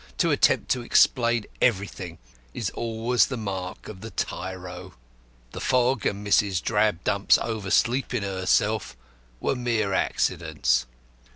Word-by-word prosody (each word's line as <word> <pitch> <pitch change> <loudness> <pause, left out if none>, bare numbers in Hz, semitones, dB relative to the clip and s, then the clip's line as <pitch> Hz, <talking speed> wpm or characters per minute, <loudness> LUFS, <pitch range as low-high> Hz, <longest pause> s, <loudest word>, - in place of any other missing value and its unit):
To - - +2
attempt - - +2
to 125 - +1
explain 120 -2 +3 0.2
everything 95 -6 0 0.4
is - - -2
always 115 +1 +1
the 130 - -4
mark 95 -4 -5
of 95 -3 -9
the 115 - -7
tyro. 95 -3 -5 0.6
The - - -7
fog 125 -1 +2
and 100 +1 -3
Mrs. 100 -2 +3
Drabdump's 105 0 +2
oversleeping 115 +3 0
herself 95 - 0 0.4
were - - 0
mere 115 -5 0
accidents. 60 -8 0
105 Hz, 115 wpm, -25 LUFS, 95-120 Hz, 0.6 s, explain